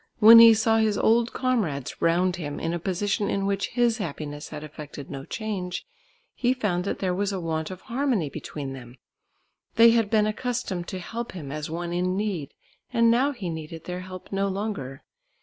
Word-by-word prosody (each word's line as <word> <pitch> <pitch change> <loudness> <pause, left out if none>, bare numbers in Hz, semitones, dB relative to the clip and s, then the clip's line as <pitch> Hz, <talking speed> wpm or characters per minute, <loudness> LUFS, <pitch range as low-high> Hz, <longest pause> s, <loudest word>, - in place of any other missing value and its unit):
When 230 +1 +10
he 230 -1 +9
saw 225 +1 +3
his 215 -2 +2
old 230 +1 +3
comrades 195 - -1
round 175 +2 +2
him 145 -4 -5
in 165 +1 -2
a 175 - -2
position 195 +3 -1
in 195 0 0
which 200 0 0
his 240 -1 +1
happiness 150 -4 -5
had 150 -1 -7
effected 150 -2 -9
no 135 -1 -6
change, 200 -5 -4 0.5
he 250 +1 +1
found 190 -7 -1
that - - -2
there 185 -2 -1
was 200 +2 -1
a 195 - -3
want 160 -2 -2
of 185 -1 -8
harmony 240 - 0
between 140 0 -6
them. 125 -1 -11 0.8
They 230 0 +8
had 225 -3 +2
been 215 -1 +3
accustomed 215 -5 -3
to 190 - -5
help 230 +6 -6
him 150 -7 -7
as 150 0 -4
one 170 +1 -4
in 180 +1 0
need 195 -9 -3 0.4
and 230 -1 +4
now 260 +5 +3
he 235 -10 -6
needed 160 0 -7
their 180 0 -5
help 185 0 -10
no 195 0 0
longer. 195 -10 -4
190 Hz, 190 wpm, -26 LUFS, 160-225 Hz, 0.8 s, When